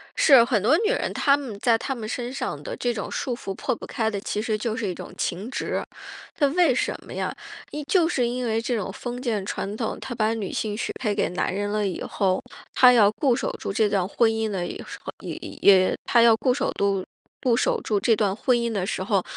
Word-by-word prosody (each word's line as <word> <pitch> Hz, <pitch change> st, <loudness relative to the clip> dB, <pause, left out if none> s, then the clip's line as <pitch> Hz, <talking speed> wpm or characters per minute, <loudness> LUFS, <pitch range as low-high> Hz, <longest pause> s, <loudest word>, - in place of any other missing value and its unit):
是， 270 Hz, -6 st, +7 dB
很 235 Hz, -4 st, +1 dB
多 255 Hz, -, +4 dB
女 435 Hz, +2 st, +1 dB
人， -, -, -1 dB
她 280 Hz, -1 st, +3 dB
们 255 Hz, -8 st, -7 dB
在 230 Hz, +1 st, +3 dB
她 270 Hz, +4 st, -3 dB
们 225 Hz, -3 st, -6 dB
身 245 Hz, +2 st, -4 dB
上 -, -, -4 dB
的 -, -, -5 dB
这 245 Hz, -1 st, -1 dB
种 210 Hz, -, -5 dB
束 250 Hz, -3 st, -2 dB
缚 200 Hz, -5 st, -6 dB
破 -, -, -2 dB
不 -, -, -9 dB
开 220 Hz, -1 st, -1 dB
的， 205 Hz, -2 st, -3 dB
其 210 Hz, -, -2 dB
实 220 Hz, -1 st, -1 dB
就 220 Hz, +1 st, -2 dB
是 225 Hz, -4 st, -2 dB
一 185 Hz, -, -2 dB
种 -, -, -9 dB
情 190 Hz, +6 st, -3 dB
执。 265 Hz, -, -2 dB, 0.5 s
她 295 Hz, -6 st, +3 dB
为 320 Hz, -1 st, +3 dB
什 -, -, 0 dB
么 -, -, -9 dB
呀？ -, -, -3 dB, 0.4 s
因 300 Hz, -, -4 dB
就 350 Hz, -4 st, +3 dB
是 255 Hz, -8 st, +1 dB
因 250 Hz, +1 st, -2 dB
为 225 Hz, -1 st, 0 dB
这 240 Hz, +1 st, -1 dB
种 210 Hz, -4 st, -3 dB
封 245 Hz, 0 st, -6 dB
建 220 Hz, -6 st, -1 dB
传 200 Hz, 0 st, -4 dB
统， 225 Hz, -2 st, -2 dB
她 265 Hz, -, -6 dB
把 220 Hz, -1 st, +1 dB
女 215 Hz, -4 st, -4 dB
性 210 Hz, -2 st, -2 dB
许 220 Hz, -, -3 dB
配 215 Hz, -5 st, 0 dB
给 -, -, +1 dB
男 180 Hz, -, -1 dB
人 205 Hz, +1 st, -2 dB
了 210 Hz, -1 st, 0 dB
以 185 Hz, -, -4 dB
后， 185 Hz, -2 st, 0 dB, 0.3 s
她 250 Hz, -1 st, +7 dB
要 210 Hz, -4 st, +6 dB
固 250 Hz, +2 st, +1 dB
守 -, -, -2 dB
住 -, -, -3 dB
这 215 Hz, +2 st, +2 dB
段 190 Hz, -3 st, +1 dB
婚 225 Hz, +3 st, +2 dB
姻 220 Hz, 0 st, -1 dB
的 190 Hz, -4 st, -2 dB
一 -, -, -5 dB
时 -, -, -9 dB
候 -, -, -5 dB
一 -, -, -7 dB
一， -, -, -8 dB
也 190 Hz, -2 st, +6 dB
她 235 Hz, -, +4 dB
要 230 Hz, -1 st, +7 dB
固守住 210 Hz, -6 st, 0 dB, 0.4 s
固 250 Hz, -3 st, +3 dB
守 245 Hz, -, +1 dB
住 210 Hz, -2 st, 0 dB
这 225 Hz, +2 st, +3 dB
段 205 Hz, -3 st, 0 dB
婚 250 Hz, +2 st, +2 dB
姻 235 Hz, -1 st, -1 dB
的 200 Hz, -4 st, -1 dB
时 185 Hz, -, -2 dB
候， 195 Hz, -2 st, +1 dB
225 Hz, 275 characters per minute, -24 LUFS, 205-250 Hz, 0.5 s, 是